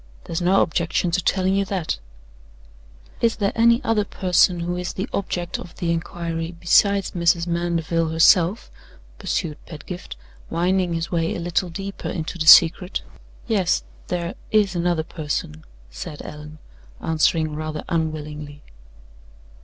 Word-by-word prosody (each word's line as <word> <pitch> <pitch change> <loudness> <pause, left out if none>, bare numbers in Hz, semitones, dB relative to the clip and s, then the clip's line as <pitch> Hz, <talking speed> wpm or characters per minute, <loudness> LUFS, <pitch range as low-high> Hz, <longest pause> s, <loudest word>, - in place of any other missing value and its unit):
"There's 165 +1 -4
no 185 +3 +4
objection 170 +2 0
to 180 +1 0
telling 190 +1 +1
you 200 0 +2
that." 185 - -2 1.2
"Is 230 -1 +2
there 200 -2 0
any 235 +2 +4
other 220 -2 +2
person 180 -3 +2
who 175 +1 -2
is 180 0 -4
the 195 +4 -3
object 180 -2 -3
of 175 - -10
the 170 -1 -1
inquiry 165 0 -3
besides 200 +3 +3
Mrs. 170 -1 +2
Mandeville, 170 -1 0
herself?" 170 +4 +4 0.5
pursued 155 -3 -3
Pedgift, 175 +3 -8 0.3
winding 180 +1 +1
his 165 0 -3
way 165 -2 0
a - - -4
little 175 +2 -1
deeper 195 +3 -6
into 165 +1 -4
the 155 - -1
secret. 175 +3 +7 0.4
"Yes; 195 -6 +1 0.2
there 175 0 -2 0.2
is 205 -3 +2
another 170 -2 +1
person," 145 - -4 0.3
said 145 - -7
Allan, 150 +1 -9 0.4
answering 160 -1 +1
rather 155 0 -4
unwillingly. 150 -3 -4
170 Hz, 135 wpm, -22 LUFS, 160-185 Hz, 1.2 s, secret